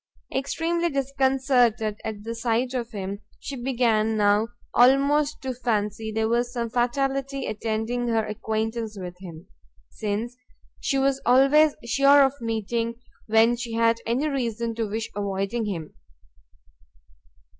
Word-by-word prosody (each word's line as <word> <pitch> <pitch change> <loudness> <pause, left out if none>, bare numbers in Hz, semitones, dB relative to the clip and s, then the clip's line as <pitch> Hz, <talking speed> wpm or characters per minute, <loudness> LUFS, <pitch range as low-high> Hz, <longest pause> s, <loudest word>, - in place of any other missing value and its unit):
Extremely 330 +5 0
disconcerted 265 -6 +1
at 215 -2 -5
the 230 +1 -4
sight 235 +2 -1
of 240 -2 -3
him, 200 -2 -5 0.2
she 280 - -6
began 235 -4 +1
now 205 +1 +3 0.3
almost 280 +4 +4
to 260 -1 -2
fancy 220 -3 -2
there 220 0 0
was 240 +1 0
some 235 -2 -3
fatality 270 +2 -1
attending 220 +3 -2
her 225 -2 +1
acquaintance 220 0 -3
with 180 -1 -7
him, 170 -2 -10 0.5
since 220 +3 -3 0.4
she 275 - 0
was 270 0 +1
always 275 +5 +5
sure 275 +4 +5
of 270 -1 +2
meeting, 230 +1 -2 0.3
when 225 +2 +4
she 235 -1 -6
had 230 0 +2
any 255 +6 +1
reason 235 -5 -2
to 225 -1 -2
wish 220 +2 -3
avoiding 200 +3 -2
him. 170 -7 -5
235 Hz, 130 wpm, -25 LUFS, 220-265 Hz, 0.5 s, always